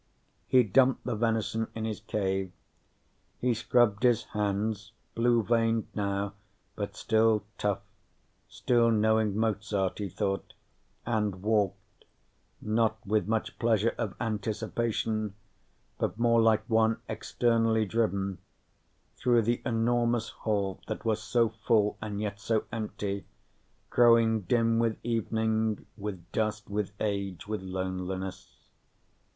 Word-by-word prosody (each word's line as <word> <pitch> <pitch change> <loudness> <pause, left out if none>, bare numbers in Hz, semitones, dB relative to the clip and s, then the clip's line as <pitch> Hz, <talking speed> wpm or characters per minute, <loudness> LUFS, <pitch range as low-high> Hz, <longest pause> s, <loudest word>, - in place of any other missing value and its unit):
He 130 -1 +5
dumped 125 +5 +3
the 125 - -1
venison 115 0 0
in 110 0 -3
his 110 -2 -3
cave. 95 -2 -2 0.9
He 125 -1 +2
scrubbed 115 -1 +2
his 120 -3 +3
hands, 105 0 -2 0.2
blue 115 0 +3
veined 115 0 +1
now, 100 0 -1 0.4
but - - -4
still 110 -2 +2 0.2
tough, 100 -1 0 0.7
still 120 -2 +2
knowing 110 -1 +2
Mozart, 105 -3 0
he 100 -2 -3
thought, 95 +2 -3 0.5
and 105 -5 -1
walked 105 -3 -1 0.5
not 110 0 +1
with 105 +1 +1
much 110 0 -2
pleasure 115 -1 +2
of 110 -5 -2
anticipation, 110 -1 -2 0.6
but - - -1
more 115 0 +4
like 110 -1 +3
one 110 0 +3
externally 115 -2 +1
driven 100 -3 -1 0.8
through 120 -2 +3
the 120 +2 0
enormous 120 0 +1
hall 100 -3 -2
that - - -5
was 110 -1 +1
so 115 0 +2
full 110 -1 +1
and 105 -2 -4
yet 100 -1 -3
so 110 +1 0
empty, 100 -4 -4 0.6
growing 115 -2 +5
dim 115 +4 +2
with 115 -2 +1
evening, 110 -1 0
with 100 -5 -6
dust, 110 -1 -2
with 105 -1 -1
age, 100 -4 -2
with 110 -2 -3
loneliness. 95 0 -5
110 Hz, 120 wpm, -29 LUFS, 100-115 Hz, 0.9 s, He